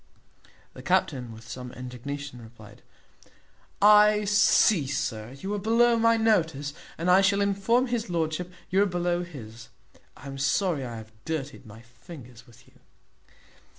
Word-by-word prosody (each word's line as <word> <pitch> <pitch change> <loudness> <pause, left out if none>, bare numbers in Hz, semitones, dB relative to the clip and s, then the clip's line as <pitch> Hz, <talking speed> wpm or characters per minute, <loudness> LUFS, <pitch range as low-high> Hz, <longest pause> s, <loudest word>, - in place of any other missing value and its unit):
The - - -11
captain, 125 -4 0
with 115 +1 -13
some 125 0 -8
indignation, 130 +1 -7
replied, 110 -2 -15 1.0
"I 210 0 +6
see, 200 -5 +4
sir, 115 -4 -4
you 195 +5 -4
are 205 - -2
below 230 +3 +3
my 230 0 +4
notice, 160 -10 +1 0.2
and 165 - -3
I 180 +2 +6
shall 195 +1 +2
inform 200 +5 +1
his 235 -4 -3
lordship 170 +1 -2 0.2
you 190 +2 +3
are 205 - +3
below 175 -1 -1
his. 120 -9 -11 0.5
I 130 - -14
am 135 0 -7
sorry 145 +2 0
I 120 -2 -6
have 110 0 -12
dirtied 145 -5 -5
my 110 +2 -13
fingers 120 +1 -14
with 120 +2 -20
you." - - -24
160 Hz, 150 wpm, -26 LUFS, 125-200 Hz, 1.0 s, I